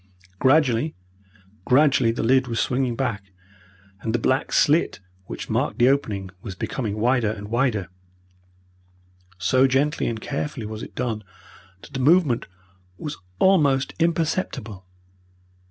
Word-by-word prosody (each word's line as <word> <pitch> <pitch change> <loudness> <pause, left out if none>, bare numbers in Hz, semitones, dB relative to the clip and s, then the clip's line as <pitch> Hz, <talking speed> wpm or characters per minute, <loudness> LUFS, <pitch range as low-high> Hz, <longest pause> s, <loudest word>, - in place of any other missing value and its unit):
Gradually, 135 0 +3 0.7
gradually 135 -2 +4
the 115 - -3
lid 130 +3 +3
was 115 -2 -2
swinging 125 +1 0
back, 120 -5 -2 0.8
and 110 +1 -1
the - - +3
black 130 +3 0
slit 155 +4 +3 0.3
which - - -7
marked - - -1
the 120 +2 +5
opening 105 -9 -1
was 95 - -7
becoming 105 +1 -3
wider 120 0 +2
and 105 -1 -6
wider. 120 -6 0 1.5
So 130 +9 +3
gently 140 +3 +1
and 115 -1 -3
carefully 140 -2 -4
was 110 +1 -6
it - - -9
done 110 -3 -2 0.6
that - - -14
the 135 - -3
movement 145 -3 +3 0.5
was 150 +6 -5 0.2
almost 145 - +3
imperceptible. 155 - -1
125 Hz, 125 wpm, -23 LUFS, 110-140 Hz, 1.5 s, the